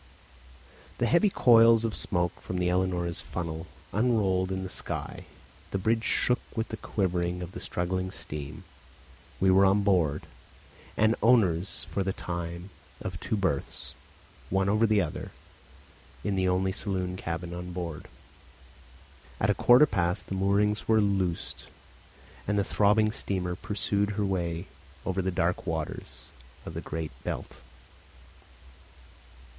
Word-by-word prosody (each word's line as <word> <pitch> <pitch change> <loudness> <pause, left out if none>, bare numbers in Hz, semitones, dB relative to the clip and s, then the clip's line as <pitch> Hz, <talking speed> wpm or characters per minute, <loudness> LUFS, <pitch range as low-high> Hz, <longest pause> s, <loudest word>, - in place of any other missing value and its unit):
The 120 - +1
heavy 170 - +4
coils 115 - +6
of 110 - -2
smoke 85 -1 -1
from 90 - -4
the 90 0 +1
Ellenora's 90 -2 0
funnel 85 -1 -5 0.3
unrolled 100 -5 +2
in 95 0 -2
the - - -3
sky, - - -5 0.4
the - - -1
bridge 110 +4 +1
shook 125 - +2 0.2
with 110 -1 -2
the 110 - -4
quivering 90 -4 -1
of 90 - -7
the - - -7
struggling 90 +1 -2
steam; 75 -4 -7 0.8
we 95 0 +4
were 95 +1 +6
on 100 +1 +4
board, 85 -7 +2 0.7
and 110 +1 +4
owners 100 -7 +3
for 100 - 0
the 95 0 0
time 85 +1 -5 0.3
of - - -5
two 110 - -1
berths, 95 -9 -2 0.6
one 95 +1 +2
over 110 +3 +4
the 105 -1 +4
other, 80 -4 -4 0.9
in 105 - 0
the 95 -1 +1
only 95 +1 +1
saloon 95 -2 -2
cabin 85 -1 -4
on 90 +1 -6
board. 85 -3 -5 1.3
At 100 - +3
a - - +3
quarter 125 +7 +7
past 90 -9 -1
the - - -5
moorings 100 +2 +1
were 110 -1 +5
loosed 95 -4 -1 0.8
and 105 0 +1
the 100 - +3
throbbing 105 +2 +3
steamer 90 -4 -2
pursued 100 +1 -1
her 105 - +1
way 85 -2 -1 0.4
over 95 0 0
the 95 - 0
dark 90 0 0
waters 80 -2 -4 0.4
of - - -6
the - - -4
Great 80 -1 -4
Belt. - - -5
95 Hz, 140 wpm, -28 LUFS, 90-105 Hz, 1.3 s, quarter